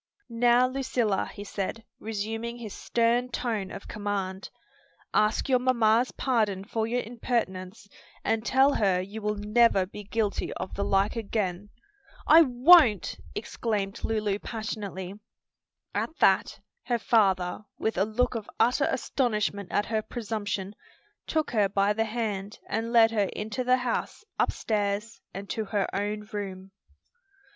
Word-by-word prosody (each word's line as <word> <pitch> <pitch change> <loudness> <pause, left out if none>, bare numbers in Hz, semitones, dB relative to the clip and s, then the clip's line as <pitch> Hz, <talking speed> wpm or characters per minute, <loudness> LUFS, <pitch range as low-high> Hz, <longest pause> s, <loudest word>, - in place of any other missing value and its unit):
"Now, 240 +1 +4
Lucilla," 255 -6 -1
he 205 - -8
said, 205 +2 -4
resuming 225 +2 -4
his 220 -4 -7
stern 240 +1 +1
tone 225 -5 -2
of - - -9
command, 200 -2 -3 0.6
"ask 215 +5 +2
your 255 -2 +3
mamma's 240 -1 +3
pardon 215 -7 0
for 220 +1 -2
your 245 +2 -1
impertinence, 210 -4 -3 0.4
and 225 0 0
tell 265 +4 +4
her 195 -4 +2
you 200 +4 -6
will 210 0 -1
never 210 -1 +3
be 210 +2 -9
guilty 210 0 -1
of 185 - -6
the 200 - -2
like 195 +3 +1
again." 205 -3 -2 0.6
"I 320 +2 +8
won't!" 255 - +5 0.2
exclaimed 205 -4 -3
Lulu 210 -2 0
passionately. 205 -4 -5 0.7
At 320 - -2
that, 190 - +3 0.3
her 240 -1 +1
father, 195 -4 +2
with 220 - -1
a 190 - +2
look 220 +5 0
of 225 -3 -5
utter 245 - +3
astonishment 210 -6 -1
at 205 - +1
her 220 -1 -1
presumption, 205 -4 -4 0.5
took 315 -1 0
her 210 -4 +2
by 200 +1 +2
the 225 +1 0
hand 210 -3 -3
and 230 +1 -2
led 225 -1 +6
her 205 -4 +1
into 215 +4 -3
the 250 +1 +4
house, 250 - -3
upstairs 210 +1 -1
and 195 +1 -7
to 220 - -2
her 200 -1 0
own 210 +1 -2
room. 195 -2 -5
215 Hz, 140 wpm, -27 LUFS, 200-235 Hz, 0.7 s, I